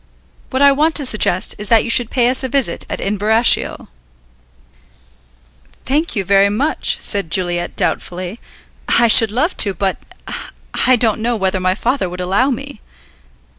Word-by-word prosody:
What 260 +1 0
I 280 - +6
want 310 +4 0
to 290 - 0
suggest 210 -6 +1
is 210 - -5
that 225 0 +3
you - - -6
should 240 -1 +1
pay 245 -3 +1
us 255 +2 0
a 260 - -3
visit 260 -10 -1
at - - -5
Inverashiel." 210 +4 +1 2.0
"Thank 300 +4 -1
you 200 - -1
very 200 +1 +3
much," 270 +10 -1
said 200 -5 0
Juliet 175 0 -1
doubtfully. 185 +5 -3 0.5
"I 235 - +4
should 225 0 +7
love 260 - -1
to, 200 -3 +3
but 190 +1 -2 0.9
I 255 - +5
don't 220 -2 0
know 240 +1 -1
whether 190 -2 -1
my 185 0 0
father 240 -2 -2
would 180 +1 -9
allow 195 +9 0
me." 245 - -6
220 Hz, 160 wpm, -16 LUFS, 190-255 Hz, 2.0 s, should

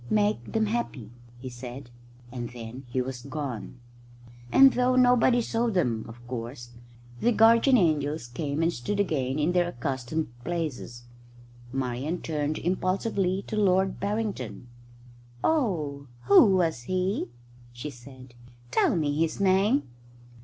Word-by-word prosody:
"Make 210 0 +1
them 220 -1 +2
happy," 205 - -3 0.3
he 130 +2 -8
said, 125 +1 -9 0.4
and 120 -2 -5
then 120 +2 -9
he 125 +1 -1
was 125 -1 -6
gone; 135 -4 -6 0.7
and 270 -1 +7
though 250 0 +2
nobody 245 -1 +4
saw 230 +1 0
them, 125 - 0
of 120 +1 -12
course, 120 0 -6 0.5
the 240 - +3
guardian 230 +4 +5
angels 155 - +1
came 140 +5 -3
and 170 +1 +2
stood 185 +12 -3
again 140 -8 0
in 155 +3 +1
their 180 -1 +2
accustomed 130 +1 -3
places. 150 -7 -4 0.7
Marian 135 +6 -2
turned 150 -1 -2
impulsively 185 +1 0
to - - -5
Lord 190 -2 +2
Barrington. 200 - -3 0.7
"Oh, 155 - 0 0.2
who 200 - +7
was 165 -8 +1
he?" 185 +2 0 0.4
she 120 +5 -7
said. 130 0 -14 0.4
"Tell - - +3
me 150 -3 0
his 165 +3 0
name." 200 +7 +3
155 Hz, 130 wpm, -27 LUFS, 125-200 Hz, 0.7 s, and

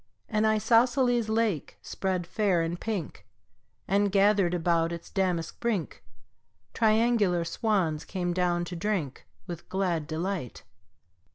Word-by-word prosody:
An 215 0 +1
isosceles 235 +2 +3
lake 220 -8 -1
spread 185 -2 -2
fair 185 -2 +1
and 170 +1 -3
pink, 205 -8 -4 0.6
And, 200 +1 +2
gathered 195 -2 +3
about 170 -1 +1
its 170 -1 -7
damask 180 -4 -1
brink, 220 -8 -2 0.7
Triangular 215 -6 +2
swans 170 -5 0
came 175 -2 -3
down 175 -1 0
to 175 - -6
drink 170 -7 -3 0.2
With 175 -3 -8
glad 175 -5 -1
delight. 165 - -4
190 Hz, 115 wpm, -28 LUFS, 170-215 Hz, 0.7 s, isosceles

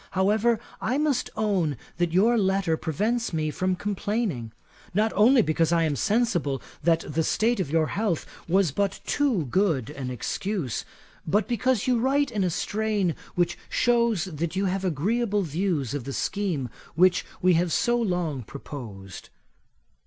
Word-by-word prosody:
However, 215 +4 +3 0.2
I 250 +4 0
must 295 -4 +1
own 190 - +1 0.2
that 175 -1 +1
your 210 +7 +4
letter 190 -5 +2
prevents 215 - -1
me 155 -1 0
from 185 +4 0
complaining; 200 - -2 0.4
not 215 +2 +2
only 230 +4 +6
because 160 0 +1
I 170 -1 +3
am 155 -3 +1
sensible 195 - +1 0.2
that 165 +1 +3
the 155 +2 0
state 225 +7 +1
of 180 - -1
your 160 +1 +2
health 200 -2 -1 0.2
was 185 -2 +3
but 200 +5 -1
too 260 - +1
good 160 - +1
an 135 -3 -5
excuse, 135 - -3 0.4
but 205 +7 +2
because 245 -1 +1
you 250 -2 +2
write 275 +2 +2
in 210 -4 0
a 180 - +2
strain 205 0 0 0.2
which 175 0 0
shews 235 -6 +2
that 170 -1 -4
you 195 +1 +1
have 190 +1 -1
agreeable 200 - 0
views 160 - -1
of 140 -5 -4
the 135 - -4
scheme 175 -11 -1 0.3
which 180 +2 +4 0.2
we 185 0 +4
have 170 +1 +2
so 240 +8 +2
long 180 - -1
proposed. 110 -6 -9
185 Hz, 155 wpm, -26 LUFS, 155-215 Hz, 0.4 s, only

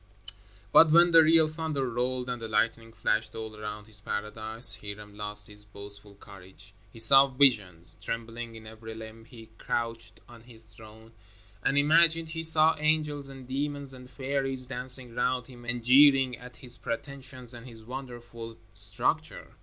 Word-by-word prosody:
But 160 - +7
when 170 +2 +5
the 165 -1 +8
real 160 0 +5
thunder 155 -4 -4
rolled 125 +1 -2
and 125 -1 -5
the 115 - -5
lightning 115 +1 -1
flashed 110 -1 -2
all 110 -1 -7
around 105 0 -8
his 105 -1 -13
paradise, 110 +3 +3
Hiram 105 0 -10
lost 105 0 -6
his 105 0 -5
boastful 100 0 -9
courage. 95 0 -15 0.2
He - - -16
saw 135 +5 +6
visions. 95 -12 +1
Trembling 115 0 -6
in 110 0 -12
every 110 0 -11
limb, 110 0 -11
he 115 -2 -15
crouched 115 0 -4
on 120 -1 -15
his 115 -2 -16
throne 110 +1 -15 0.5
and 135 - 0
imagined 165 +2 +3
he 165 0 -5
saw 160 0 +6
angels 150 -2 -1
and 135 -2 -12
demons 140 +1 -4
and 125 -1 -13
fairies 135 0 -3
dancing 125 -1 +3
round 125 0 -1
him 120 -1 -15
and 120 0 -4
jeering 135 0 +5
at 125 +1 -14
his 125 -1 -11
pretensions 130 0 -2
and 120 +1 -11
his 110 -2 -14
wonderful 120 -3 -9 0.2
structure. 105 +11 -3
120 Hz, 160 wpm, -27 LUFS, 110-135 Hz, 0.5 s, the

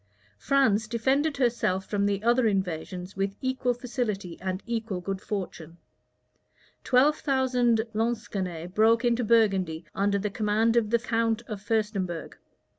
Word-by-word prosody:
France 220 - +2
defended 270 +6 +1
herself 230 -7 +1
from 200 -1 0
the 200 0 -1
other 240 +1 +3
invasions 185 -1 -3
with 195 0 -2
equal 260 -1 0
facility 220 -8 -3
and 185 0 -3
equal 225 -5 -3
good 195 +2 -4
fortune. 170 -5 -5 1.1
Twelve 275 +4 +4
thousand 250 -4 +2
Lansquenets 200 -7 -3
broke 225 +3 +4
into 240 0 +2
Burgundy 195 -8 +2
under 200 +1 +1
the 205 +1 -2
command 220 +2 +1
of 230 -3 +2
the 235 - +4
count 230 -1 0
of 210 -3 -6
Furstenberg. 205 -6 -2
215 Hz, 130 wpm, -27 LUFS, 195-235 Hz, 1.1 s, Twelve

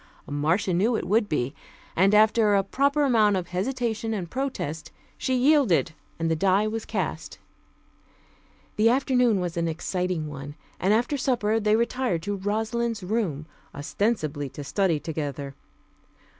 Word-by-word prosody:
Marcia 160 +7 0
knew 215 +7 +2
it - - -2
would 210 +2 +2
be, 135 -3 -1 0.4
and 195 +4 +4
after 215 0 +4
a 195 - +3
proper 280 +8 +1
amount 215 -7 +4
of 175 -1 -4
hesitation 225 +3 -2
and 175 -5 -5
protest, 160 - -4 0.2
she 260 - -1
yielded, 255 - +3 0.3
and 165 - -1
the 165 - +1
die 195 +5 +2
was 220 +1 -3
cast. - - -4 1.4
The 220 +2 +5
afternoon 250 -4 +2
was 175 -2 -3
an 170 0 0
exciting 175 0 -2
one, 145 0 -8 0.2
and 190 - +2
after 240 +6 +2
supper 235 -5 +1
they 210 0 +3
retired 235 -6 0
to 205 +1 -2
Rosalind's 220 +2 -2
room, 180 -8 -2 0.3
ostensibly 150 - -1
to 145 - -8
study 170 +2 +1
together. 145 -3 -4
205 Hz, 145 wpm, -25 LUFS, 165-230 Hz, 1.4 s, The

